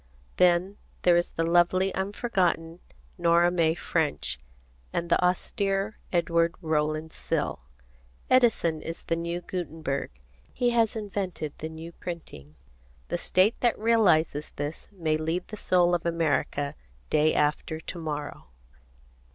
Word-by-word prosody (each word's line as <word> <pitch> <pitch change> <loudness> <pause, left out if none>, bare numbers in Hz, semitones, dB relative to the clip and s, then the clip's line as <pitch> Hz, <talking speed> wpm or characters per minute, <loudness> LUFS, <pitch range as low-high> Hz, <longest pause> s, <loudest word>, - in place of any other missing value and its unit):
Then 180 +3 +3 0.3
there 175 -1 +6
is 175 0 +2
the 165 - 0
lovely 175 +3 +3
unforgotten 190 -5 -1 0.4
Nora 170 0 +4
May 165 -2 +2
French 155 - -1 0.5
and 170 0 -3
the - - +4
austere 195 +3 0
Edward 170 -1 +2
Rowland 155 -1 -1
Sill. - - -2 0.7
Edison 225 -11 +3
is 165 - -6
the 165 - 0
new 170 +1 -3
Gutenberg. 160 -6 -3 0.4
He 245 -1 +1
has 230 -2 +2
invented 195 -8 -4
the 160 - -4
new 160 +1 -8
printing. 75 - -8 0.5
The - - -1
state 190 +5 +3
that 240 -2 +2
realizes 175 -10 +3
this 145 +2 -5
may 160 -6 0
lead 165 +3 -2
the 215 - -6
soul 180 -3 +3
of 175 - +1
America, 155 -3 0 0.4
day 155 0 +3
after 150 +1 0
to 170 +2 -7
morrow. 150 - -5
170 Hz, 125 wpm, -27 LUFS, 160-185 Hz, 0.7 s, there